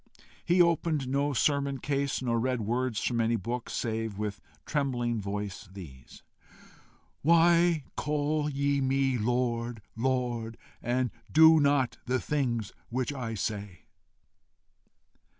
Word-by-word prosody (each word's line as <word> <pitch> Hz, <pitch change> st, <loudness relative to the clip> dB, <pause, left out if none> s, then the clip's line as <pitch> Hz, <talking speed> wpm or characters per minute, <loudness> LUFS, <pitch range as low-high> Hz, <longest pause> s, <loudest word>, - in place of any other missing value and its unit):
He 175 Hz, +1 st, +5 dB
opened 165 Hz, -4 st, 0 dB
no 140 Hz, +2 st, +1 dB
sermon 140 Hz, +1 st, +1 dB
case, 140 Hz, 0 st, -1 dB
nor 115 Hz, -2 st, +1 dB
read 125 Hz, 0 st, 0 dB
words 120 Hz, +1 st, -1 dB
from 120 Hz, -2 st, +1 dB
any 115 Hz, +1 st, +2 dB
book, 120 Hz, +4 st, -4 dB
save, 110 Hz, -3 st, -3 dB
with 105 Hz, -2 st, -4 dB, 0.2 s
trembling 120 Hz, -6 st, -1 dB
voice, 100 Hz, -1 st, -5 dB
these: 70 Hz, -10 st, -12 dB, 1.0 s
"WHY 170 Hz, 0 st, +4 dB
CALL 150 Hz, 0 st, 0 dB
YE 140 Hz, 0 st, 0 dB
ME 135 Hz, -1 st, +1 dB
LORD, 120 Hz, -1 st, -1 dB
LORD, 120 Hz, -2 st, -1 dB, 0.2 s
AND 125 Hz, 0 st, 0 dB, 0.2 s
DO 160 Hz, 0 st, +7 dB
NOT 140 Hz, -3 st, +2 dB
THE 130 Hz, +1 st, +1 dB
THINGS 120 Hz, -8 st, -1 dB, 0.2 s
WHICH 130 Hz, +3 st, -2 dB
I 120 Hz, -5 st, -4 dB
SAY?" 100 Hz, -3 st, -4 dB
125 Hz, 115 wpm, -29 LUFS, 115-140 Hz, 1.0 s, DO